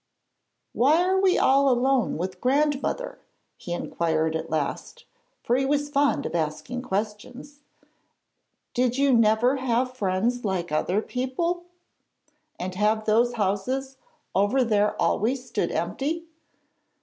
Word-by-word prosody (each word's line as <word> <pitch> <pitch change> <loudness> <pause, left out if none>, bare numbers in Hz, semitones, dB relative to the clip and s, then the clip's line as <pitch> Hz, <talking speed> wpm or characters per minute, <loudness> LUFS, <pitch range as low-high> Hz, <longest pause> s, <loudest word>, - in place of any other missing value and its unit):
'Why 290 +7 +4
are 375 +1 +2
we 380 -2 +3
all 275 +1 +4
alone 255 0 +2
with 185 +2 -5
grandmother?' 295 - 0 0.4
he 175 - -9
inquired 160 -2 -1
at 160 0 -4
last, 150 -3 -3 0.4
for 240 - +1
he 265 - +1
was 290 +1 0
fond 285 0 +1
of - - -4
asking 170 +10 -3
questions. 240 +6 -5 1.1
'Did 250 0 +1
you 275 -1 +3
never 230 +3 +3
have 255 0 0
friends 220 +3 -1
like 185 -5 -2
other 180 +7 0
people, 335 +8 -2 0.9
and 185 +1 -4
have 215 +3 +1
those 235 +3 +3
houses 245 +6 -2 0.4
over 205 +8 +2
there 210 -3 +1
always 250 +4 0
stood 225 -8 -2
empty?' 295 - -2
245 Hz, 125 wpm, -25 LUFS, 200-270 Hz, 1.1 s, Why